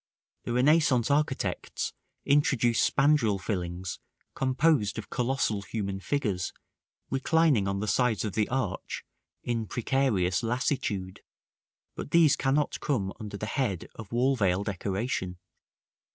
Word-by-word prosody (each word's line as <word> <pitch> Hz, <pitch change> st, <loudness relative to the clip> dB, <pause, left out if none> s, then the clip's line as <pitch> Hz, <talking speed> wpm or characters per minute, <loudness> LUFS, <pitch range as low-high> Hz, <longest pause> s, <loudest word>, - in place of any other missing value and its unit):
The 120 Hz, -, -2 dB
Renaissance 135 Hz, -1 st, +3 dB
architects 130 Hz, -10 st, -1 dB, 0.3 s
introduced 130 Hz, -5 st, +3 dB
spandril 140 Hz, -9 st, +3 dB
fillings 90 Hz, -2 st, -4 dB, 0.3 s
composed 130 Hz, -3 st, +2 dB
of -, -, -7 dB
colossal 125 Hz, -4 st, 0 dB
human 100 Hz, -1 st, -4 dB
figures 100 Hz, -6 st, -1 dB, 0.6 s
reclining 135 Hz, -5 st, +3 dB
on 100 Hz, 0 st, -1 dB
the 105 Hz, -, -2 dB
sides 115 Hz, -1 st, +1 dB
of 105 Hz, -, -3 dB
the 105 Hz, -2 st, 0 dB
arch, 125 Hz, -6 st, -3 dB, 0.4 s
in 115 Hz, -2 st, -2 dB
precarious 115 Hz, -8 st, +1 dB
lassitude; 115 Hz, -6 st, -2 dB, 0.7 s
but -, -, -6 dB
these 160 Hz, -2 st, +5 dB
cannot 140 Hz, +2 st, 0 dB
come 100 Hz, -9 st, -1 dB
under 105 Hz, -2 st, -6 dB
the 105 Hz, -, -4 dB
head 110 Hz, -, -2 dB
of 110 Hz, -3 st, -10 dB
wall 130 Hz, +3 st, +2 dB
veil 100 Hz, -4 st, +1 dB
decoration. 100 Hz, 0 st, -2 dB
115 Hz, 120 wpm, -28 LUFS, 100-135 Hz, 0.7 s, these